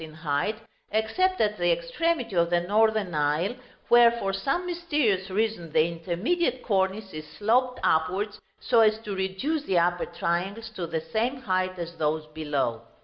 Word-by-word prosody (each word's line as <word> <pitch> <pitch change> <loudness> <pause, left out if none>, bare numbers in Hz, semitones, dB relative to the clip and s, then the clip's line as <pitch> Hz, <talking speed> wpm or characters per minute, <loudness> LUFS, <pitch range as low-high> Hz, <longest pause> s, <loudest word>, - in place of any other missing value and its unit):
in 155 -1 -10
height, 155 +6 -1 0.3
except 295 - +1
at 210 -2 +1
the 175 0 +3
extremity 230 - -1
of 170 -1 +3
the 175 0 +3
northern 210 0 +2
aisle, 150 +7 +1 0.3
where 240 0 +7
for 230 -5 -2
some 275 - -1
mysterious 295 - 0
reason 200 -4 -1
the 155 - +5
intermediate 200 - -1
cornice 195 -1 0
is 155 0 -7
sloped 250 +4 +2
upwards 190 +7 0 0.2
so 240 -2 +2
as 215 -1 +5
to 210 -2 -6
reduce 190 +12 -1
the 185 - +1
upper 175 +1 +1
triangles 190 +6 -2
to 180 -5 -5
the 165 -1 -2
same 235 +5 +1
height 185 -3 0
as 170 -1 -6
those 155 0 0
below. 140 -7 -1
195 Hz, 160 wpm, -26 LUFS, 170-225 Hz, 0.3 s, where